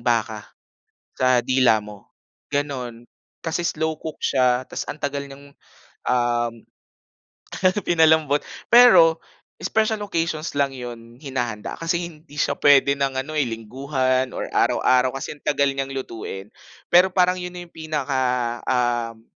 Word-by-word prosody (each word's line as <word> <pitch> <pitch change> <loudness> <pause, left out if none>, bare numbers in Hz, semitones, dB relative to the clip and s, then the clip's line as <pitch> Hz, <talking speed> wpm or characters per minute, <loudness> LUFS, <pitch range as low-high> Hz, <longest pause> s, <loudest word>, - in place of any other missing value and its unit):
baka - - -1 0.7
sa 130 -1 +3
dila 125 -5 +3
mo, 105 -1 -12 0.4
ganon, 125 -5 -3 0.4
kasi 170 +1 -1
slow 160 0 -2
cook 160 -1 -6
siya, 125 -1 +2
tas - - -5
ang - - -4
tagal 140 0 -2
niyang, 140 +1 -13 0.5
um, 120 -1 +1 1.3
pinalambot, 160 -3 +3 0.2
pero 225 -10 +7 0.4
special 220 -1 0
occasions 165 -4 -2
lang 140 -1 +1
yun 120 -2 -9
hinahanda 120 -6 -4
kasi 170 +1 -1
hindi 150 -2 -17
siya - - 0
pwede 140 -1 +5
ng 135 -1 0
ano, 155 +3 -5
eh, 140 - +2
lingguhan 130 +3 -1
or - - -4
araw-araw 130 0 +2
kasi 135 - -5
ang - - -28
tagal 140 -1 +2
niyang 135 0 -4
lutuin, 110 -6 -6 0.4
pero 180 +2 +7
parang 180 0 +3
yun 180 0 -6
yung 175 -1 -9
pinaka, 150 -4 -3 0.5
um, 120 -3 0
140 Hz, 130 wpm, -22 LUFS, 125-160 Hz, 1.3 s, pero